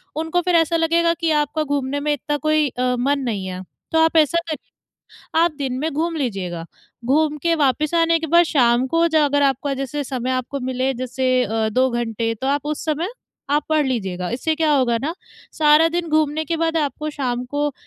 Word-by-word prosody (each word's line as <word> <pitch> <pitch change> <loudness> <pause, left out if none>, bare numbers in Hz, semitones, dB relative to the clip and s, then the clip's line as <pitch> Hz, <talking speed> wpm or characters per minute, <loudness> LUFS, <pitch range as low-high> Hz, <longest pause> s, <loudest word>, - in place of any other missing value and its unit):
उनको 320 +3 0
फिर 355 0 +1
ऐसा 330 0 +3
लगेगा 335 +1 +2
कि 335 -1 -1
आपका 310 +2 -2
घूमने 285 -1 -2
में 295 +1 0
इतना 295 +1 -2
कोई 310 +1 +2
अ, 250 0 -1
मन 280 +3 +1
नहीं 195 -3 -4
है। 185 0 -5 0.3
तो 320 - +3
आप 325 0 +2
ऐसा 315 +2 +4
करिए, 310 - -6 0.7
आप 340 0 +3
दिन 260 -3 -2
में 310 +4 -1
घूम 325 +3 -1
लीजिएगा। 190 - -3 0.4
घूम 300 +4 +2
के 335 -1 +2
वापस 300 +1 +1
आने 330 0 +3
के 325 - -4
बाद 345 0 +7
शाम 250 -5 +2
को 330 - 0 0.3
अगर 285 0 +2
आपका 275 0 +1
जैसे 275 +2 -4
समय 255 -1 -3
आपको 260 +2 -2
मिले 260 +1 -1
जैसे 255 +1 0
अ, 220 0 -1
2 255 +4 +2
घंटे 230 -1 -2
तो 245 +4 -5
आप 285 +1 0
उस 300 0 -3
समय 315 +3 -1 0.4
आप 295 0 +2
पढ़ 310 -1 +2
लीजिएगा। 190 -8 -2
इससे 265 +7 -1
क्या 315 -1 +1
होगा 255 -4 +2
ना, 315 +4 -2 0.4
सारा 305 +1 +6
दिन 345 -1 -2
घूमने 310 0 +1
के 330 +2 -2
बाद 330 0 0
आपको 305 0 -2
शाम 250 -4 -3
को 290 0 0
285 Hz, 200 wpm, -21 LUFS, 255-315 Hz, 0.7 s, बाद